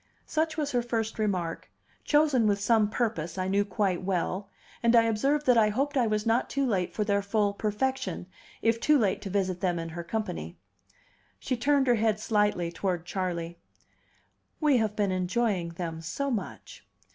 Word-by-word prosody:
Such 315 0 -1
was 295 -2 -1
her 245 - +1
first 225 -2 -2
remark, 185 -6 -2 0.3
chosen 295 -7 +3
with 200 -1 +2
some 210 0 +3
purpose, 200 -8 -2
I 185 0 -1
knew 200 +1 +2
quite 195 -2 -1
well; 185 +1 -2 0.3
and 235 0 +4
I 230 - +7
observed 270 +7 +1
that 250 -2 +5
I 215 -1 +4
hoped 275 +7 -1
I 250 -4 +3
was 215 0 0
not 230 +2 +1
too 275 0 0
late 190 -7 0
for 215 - +1
their 200 -1 +1
full 205 0 +1
perfection, 210 -2 -2 0.4
if 230 0 +2
too 300 +5 +4
late 210 -7 +1
to 200 - -5
visit 185 -2 -1
them 180 -2 +1
in 165 0 -4
her 170 +1 -6
company. 125 - -4 0.8
She 255 - -2
turned 275 +3 +2
her 245 - +4
head 220 -2 +2
slightly 210 -6 +1
toward 175 -1 -2
Charley. 175 -3 -3 1.0
"We 300 -4 +4
have 215 -2 0
been 205 -2 +1
enjoying 185 0 0
them 165 -2 -5
so 275 +12 -3
much." 220 -5 -5
210 Hz, 180 wpm, -28 LUFS, 185-240 Hz, 1.0 s, I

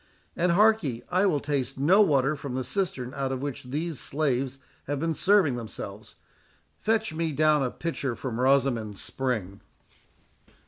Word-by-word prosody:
And, 175 0 +2
hark 215 +4 +5
ye, 125 -8 -4
I 185 +3 +3
will 155 -6 +2
taste 135 -2 -2
no 175 +10 +5
water 145 -6 +3
from 140 -3 -6
the 130 - -1
cistern 135 -9 -2
out 135 -1 -2
of 130 0 -3
which 140 -3 -5
these 150 +3 -3
slaves 135 -3 -1 0.3
have 145 0 -2
been 165 +2 0
serving 180 -6 +3
themselves—fetch 215 - -5
me 160 0 -1
down 150 0 +3
a 130 - +1
pitcher 140 -5 -3
from 120 0 -4
Rosamond's 130 -6 +2
spring." 110 -8 -3
140 Hz, 150 wpm, -27 LUFS, 130-165 Hz, 0.3 s, hark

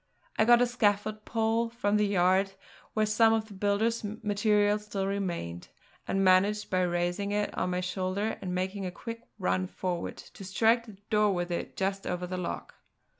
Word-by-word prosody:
I 220 - +5
got 240 +1 +6
a - - +4
scaffold 215 -2 0
pole 225 +1 +1
from 210 -3 0
the 210 0 +2
yard 190 0 +3 0.4
where 215 0 +3
some 225 +1 +4
of 220 -1 +1
the - - -10
builder's 205 +4 0
material 210 0 +1
still 205 -2 -3
remained, 175 - -3 0.4
and 195 0 +1
managed 195 +3 +3
by 185 0 +2
raising 175 +3 0
it 210 0 -1
on 180 - -1
my 180 0 -1
shoulder 185 +3 -2
and 180 -1 -3
making 190 +2 -2
a - - -4
quick 230 +5 -8
run 185 -1 0
forward 180 -2 -4
to - - -12
strike 225 +5 +2
the 210 -3 -12
door 210 -2 +3
with 175 0 -2
it 170 - -4
just 195 0 -1
over 180 0 -2
the 185 +1 -4
lock. 180 - -5
200 Hz, 180 wpm, -29 LUFS, 185-215 Hz, 0.4 s, got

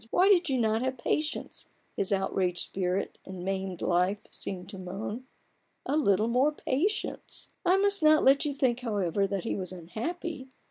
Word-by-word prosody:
Why 370 - +4
did 350 -5 +4
you 265 - +1
not 220 -1 +2
have 260 0 -1
patience? 305 +5 -2 0.3
his 195 - 0
outraged 190 -2 0
spirit 185 +1 -2
and 185 -1 -8
maimed 190 -2 -3
life 180 +3 +1
seemed 180 -2 -4
to 195 -2 -8
moan; 205 +7 -5 0.6
a 280 - 0
little 215 -8 +3
more 255 +5 +3
patience! 365 +10 -2
I 365 +1 +4
must 400 0 +3
not 310 0 +5
let 275 +1 +6
you 290 -2 -2
think, 250 -3 +1
however, 200 -5 0
that 195 -1 -2
he - - -1
was 185 -2 -4
unhappy. 260 - -5
220 Hz, 170 wpm, -29 LUFS, 190-295 Hz, 0.6 s, let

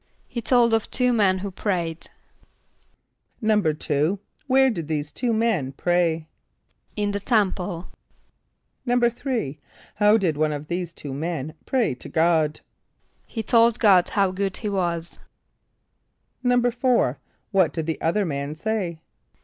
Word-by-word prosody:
=He 235 - -4
told 235 -1 +3
of 225 -1 +1
two 250 -1 +2
men 200 -5 +3
who 195 +1 -5
prayed.= 175 -4 -3 1.3
=2.= 160 -5 +1 0.3
Where 265 0 +4
did 170 -8 -5
these 150 -1 -2
two 240 - -1
men 220 - 0
pray? 165 0 0 0.7
=In 205 -1 0
the 200 - -2
temple.= 190 -5 0 1.0
=3.= 240 - 0 0.3
How 210 +1 +4
did 170 -8 0
one 155 0 +1
of 150 +1 -7
these 175 -1 -2
two 145 -4 -8
men 155 0 -3
pray 250 - +1
to 125 - -10
God? 160 -2 +2 0.7
=He 225 - -4
told 230 +1 +4
God 190 -5 +5
how 195 -2 +2
good 195 0 -2
he 210 - -3
was.= 170 -4 -2 1.2
=4.= 245 - +2 0.3
What 190 -5 +3
did 160 -2 -3
the 160 0 -3
other 195 +5 +1
man 140 -1 -3
say? 180 -3 -3
185 Hz, 130 wpm, -24 LUFS, 160-225 Hz, 1.3 s, God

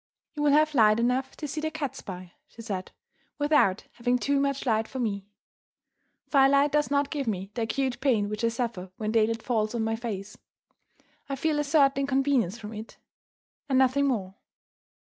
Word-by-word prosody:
"You 300 - -5
will 295 -1 +4
have 305 +1 +4
light 220 -4 +5
enough 250 +3 0
to 300 - -5
see 305 +2 -4
the 315 - -1
cats 295 -4 -5
by," 180 -3 -8 0.2
she 230 - -12
said, 195 -4 -5 0.5
"without 290 -10 +3
having 245 +1 0
too 280 +3 +1
much 275 0 -1
light 225 -2 +1
for 265 - -8
me. 200 -5 -2 1.0
Firelight 280 +1 +4
does 295 0 +1
not 280 0 +1
give 280 -5 -3
me 195 -2 -3
the 230 - -3
acute 255 +3 -1
pain 235 -7 +2
which 210 +2 -4
I - - +4
suffer 230 -5 -3
when 215 -1 -2
daylight 225 0 +1
falls 220 -2 0
on 230 - 0
my 225 0 0
face 205 -4 -6 0.9
I 275 - -1
feel 300 +2 0
a - - +1
certain 280 -2 +3
inconvenience 270 -7 +1
from 220 -1 -8
it, 215 +1 -9 0.7
and 265 - +3
nothing 265 +2 +3
more." 200 -8 -1
245 Hz, 180 wpm, -27 LUFS, 215-280 Hz, 1.0 s, light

